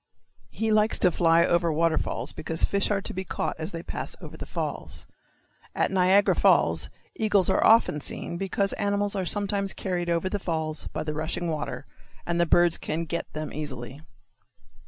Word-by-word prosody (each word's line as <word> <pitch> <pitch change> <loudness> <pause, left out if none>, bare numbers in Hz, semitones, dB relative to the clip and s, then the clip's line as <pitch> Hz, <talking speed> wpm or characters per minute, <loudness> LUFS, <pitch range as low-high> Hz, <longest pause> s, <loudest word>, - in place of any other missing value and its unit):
He 220 0 -1
likes 215 0 +3
to 180 - +3
fly 165 0 +4
over 170 -1 +2
waterfalls 165 +1 0
because 160 +1 -1
fish 200 0 0
are 200 -2 0
to - - -5
be 190 - -3
caught - - -3
as 160 - -4
they 165 0 -6
pass - - -5
over - - -10
the - - -8
falls. - - -5 0.7
At - - +1
Niagara 190 +2 +4
Falls - - +3 0.3
eagles 205 -4 +2
are - - +2
often 220 -9 +5
seen 170 - -4
because 195 +1 -1
animals 205 0 0
are 190 -2 -1
sometimes 200 +1 -1
carried 175 -2 -2
over 170 +2 +1
the 205 +2 -2
falls 160 -4 -3
by 155 - -4
the 155 -1 -3
rushing 160 +2 -2
water, 155 -2 -4 0.4
and 170 0 0
the 170 - +2
birds 175 0 +4
can 165 +2 -3
get 170 +1 -4
them 155 0 -5
easily. 135 -2 -6
175 Hz, 175 wpm, -26 LUFS, 160-200 Hz, 0.7 s, often